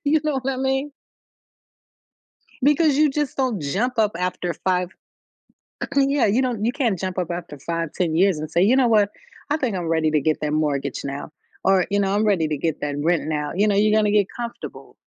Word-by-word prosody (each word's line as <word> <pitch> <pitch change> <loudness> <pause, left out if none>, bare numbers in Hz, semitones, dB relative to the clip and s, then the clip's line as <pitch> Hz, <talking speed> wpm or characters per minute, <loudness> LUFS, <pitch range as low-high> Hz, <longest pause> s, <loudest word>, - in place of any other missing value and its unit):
You 300 +2 +3
know 300 -3 0
what 270 - -1
I - - -4
mean? 270 +2 -1 1.7
Because 295 +1 +4
you 305 0 +5
just 290 -1 -2
don't 255 -8 0
jump 215 - -1
up 210 -2 +3
after 180 -1 -2
5 180 +1 -1 1.1
Yeah, 275 -1 +3
you 225 +6 +2
don't 235 -5 -1
you 235 - +1
can't 240 -9 0
jump 185 +1 -4
up 180 -2 -2
after 170 -4 -6
5, 165 +2 -3
10 170 -3 -1
years 185 0 +3
and 155 0 -5
say, 170 - +2
"You 225 +7 +4
know 260 -2 +4
what, 210 -3 +3 0.4
I 295 - +3
think 255 -10 -1
I'm 175 -2 -3
ready 160 -1 +2
to 155 -1 +2
get 155 +2 0
that 150 -1 -1
mortgage 140 -3 -1
now 140 +1 -5 0.3
or, 190 -2 +3
you 200 - +1
know, 195 0 +1
I'm 210 +1 +2
ready 185 -6 +2
to 150 - -1
get 160 +1 -2
that 145 -1 -2
rent 170 +1 +1
now." 150 -1 -2
You 205 +3 +3
know, 205 - +2
you're 210 +1 +3
gonna 210 -1 +3
get 205 -2 +3
comfortable. 235 -1 -7
195 Hz, 215 wpm, -22 LUFS, 165-250 Hz, 1.7 s, you